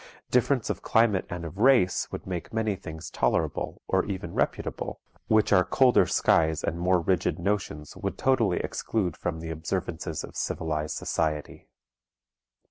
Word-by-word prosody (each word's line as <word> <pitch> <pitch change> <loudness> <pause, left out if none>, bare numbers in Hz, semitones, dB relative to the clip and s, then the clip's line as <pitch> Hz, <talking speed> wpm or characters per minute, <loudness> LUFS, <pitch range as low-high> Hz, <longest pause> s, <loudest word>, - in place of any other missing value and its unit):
Difference 125 -1 +2
of - - -5
climate 110 -4 +2
and 90 -1 -5
of 80 +4 -8
race 120 -7 +4
would - - -6
make 90 -3 -5
many 110 -2 0
things 80 -2 -8
tolerable, - - -1
or 95 0 +2
even 95 -2 -5
reputable, - - -2 0.3
which 110 -1 +3
our 90 -2 +6
colder 125 +7 +4
skies 80 -1 +2
and 85 - -2
more 90 +1 +3
rigid 85 +1 0
notions 85 -6 -2
would - - -4
totally 120 -9 +2
exclude 95 -8 -2
from 80 -2 -4
the 80 0 -5
observances 80 -1 -3
of - - -10
civilized 75 -1 -2
society. 75 -2 -2
90 Hz, 145 wpm, -27 LUFS, 80-105 Hz, 0.3 s, our